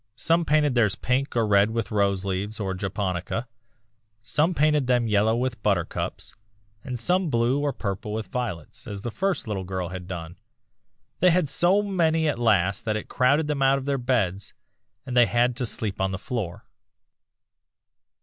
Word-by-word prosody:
Some 165 +6 +2
painted 150 -2 +3
theirs 110 -5 +2
pink 130 +2 -1
or 115 -2 +2
red 100 0 +4
with 115 0 -3
roseleaves 100 0 0
or 95 -2 -2
japonica, 95 +3 -3 0.8
some 155 +9 +1
painted 150 -3 +2
them 120 -2 +2
yellow 110 +1 +3
with 125 -1 -2
buttercups, 95 -5 -2 0.5
and 125 -2 -4
some 180 +7 +1
blue 120 +2 +2
or 145 0 0
purple 100 -3 -4
with 110 0 -3
violets, 120 - -5
as 100 -2 -6
the 120 - -3
first 190 - -1
little 100 -3 -3
girl 90 -1 -4
had 90 -1 -7
done. 85 -1 -7 0.8
They 180 - +5
had 175 -4 +2
so 185 +7 +3
many 165 -5 +1
at 145 - -1
last 100 -2 +2
that 110 -1 0
it 110 - -7
crowded 145 +5 +2
them 150 -2 -2
out 135 0 +4
of 135 - -5
their 140 -1 0
bed, 110 -7 0 0.6
and 125 - -5
they 120 -1 +6
had 120 +1 +2
to 125 - -1
sleep 105 -3 -3
on 95 - +1
the 95 - -3
floor. 105 -4 -5
115 Hz, 170 wpm, -25 LUFS, 100-140 Hz, 0.8 s, they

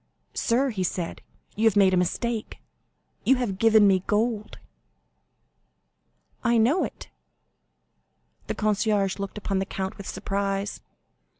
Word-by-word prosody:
"Sir," 255 +3 +1
he 200 -4 -4
said, 175 -1 -3 0.3
"you 220 - 0
have 220 -3 +4
made 195 -2 +5
a - - +5
mistake; 220 +5 -1 0.7
you 265 - +5
have 225 -7 -2
given 220 -2 +6
me 190 -2 +4
gold." 215 0 0 1.9
"I 235 -1 +3
know 255 +11 +3
it." - - -7 1.4
The - - -2
concierge 210 -2 +1
looked 200 +1 -5
upon 195 -2 -1
the 190 - -1
count 190 -1 -4
with 200 - -8
surprise. 195 +1 -2
205 Hz, 125 wpm, -26 LUFS, 195-225 Hz, 1.9 s, given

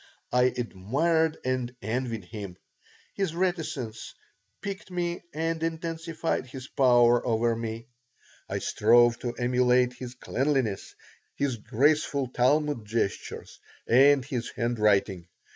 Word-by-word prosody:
I 125 0 +4
admired 145 - 0
and 130 -1 -2
envied 115 -1 -3
him. 100 -3 -8 0.6
His 195 -5 -2
reticence 160 - -3 0.4
piqued 200 -2 -6
me 175 -1 -2
and 165 +1 -2
intensified 165 -2 -3
his 130 0 -9
power 120 -3 +4
over 115 -1 +1
me. 115 0 -5 0.6
I - - -2
strove 120 0 +4
to 120 -1 -3
emulate 125 +1 +2
his 125 0 -8
cleanliness, 130 -5 -1 0.4
his 140 -4 -1
graceful 140 +3 +1
Talmud 145 0 +1
gestures, 105 -1 -3 0.3
and 135 +2 +5
his 125 -4 -3
handwriting. 105 -6 +1
125 Hz, 110 wpm, -27 LUFS, 115-150 Hz, 0.6 s, and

